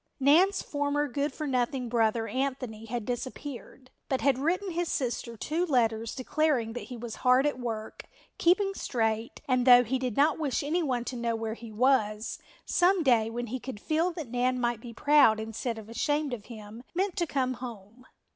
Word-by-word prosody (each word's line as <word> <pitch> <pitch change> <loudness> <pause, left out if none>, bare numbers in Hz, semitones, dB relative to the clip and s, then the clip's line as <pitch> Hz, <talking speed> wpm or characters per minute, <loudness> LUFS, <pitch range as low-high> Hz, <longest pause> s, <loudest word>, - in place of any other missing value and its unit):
Nan's 345 +9 +4
former 290 0 -1
good 285 +3 -1
for 310 - -5
nothing 255 -1 -1
brother, 225 -1 +1
Anthony, 255 -2 -3
had 230 -1 -4
disappeared, 255 +1 -6 0.2
but 265 - 0
had 275 -2 +2
written 365 +7 0
his 345 0 -1
sister 235 -3 -2
two 315 +9 -1
letters 230 -7 +1
declaring 260 -4 0
that 245 - -6
he 250 - -8
was 235 -1 -7
hard 255 +2 +4
at 290 -3 0
work, 225 -3 -5 0.3
keeping 390 +3 +3
straight, 225 - -2
and, 255 -2 +2
though 245 -1 +9
he 255 +3 -1
did 250 -4 -3
not 295 +2 +3
wish 285 -4 -1
anyone 285 -6 0
to 255 - -4
know 235 -1 -1
where 225 -1 -3
he 230 -1 -10
was, 215 -2 +1 0.3
some 360 0 +3
day 230 -5 +3
when 240 +1 -4
he 250 +3 -4
could 255 -4 -7
feel 320 - +1
that 310 -8 -7
Nan 250 +1 +1
might 240 -2 -1
be 240 - -8
proud 280 -3 +4
instead 225 +2 -4
of 220 -1 -9
ashamed 290 +5 -1
of 215 -4 -6
him, 220 -1 -10
meant 380 +1 0
to 345 -2 +1
come 260 -3 0
home. 230 0 -9
250 Hz, 185 wpm, -28 LUFS, 230-290 Hz, 0.3 s, though